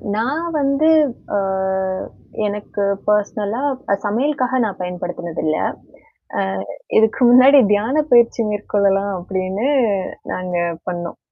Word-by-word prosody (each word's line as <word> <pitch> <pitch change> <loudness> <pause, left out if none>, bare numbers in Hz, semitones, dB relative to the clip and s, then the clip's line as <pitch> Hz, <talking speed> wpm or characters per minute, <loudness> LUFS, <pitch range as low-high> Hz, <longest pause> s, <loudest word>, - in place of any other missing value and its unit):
நான் 270 +9 -1 0.2
வந்து 275 +3 +2 0.5
அ. - - +2 1.1
எனக்குப் 200 -1 -2
பர்சனலா 210 +2 0 0.4
சமையலுக்காக 255 +4 0
நான் 195 -3 -5
பயன்படுத்தினது 175 -2 -5
இல்ல. 155 0 +1 0.8
அ. - - +2 0.6
இதுக்கு 220 +4 +2
முன்னாடி 265 +3 +7
தியானப் 270 +9 +1
பயிற்சி 235 -1 +5
மேற்கொள்ளலாம் 200 -1 0
அப்படின்னு 190 +5 -3 0.7
நாங்க 180 -1 -3 0.3
பண்ணோம். 175 -1 -5
210 Hz, 95 wpm, -19 LUFS, 190-255 Hz, 1.1 s, முன்னாடி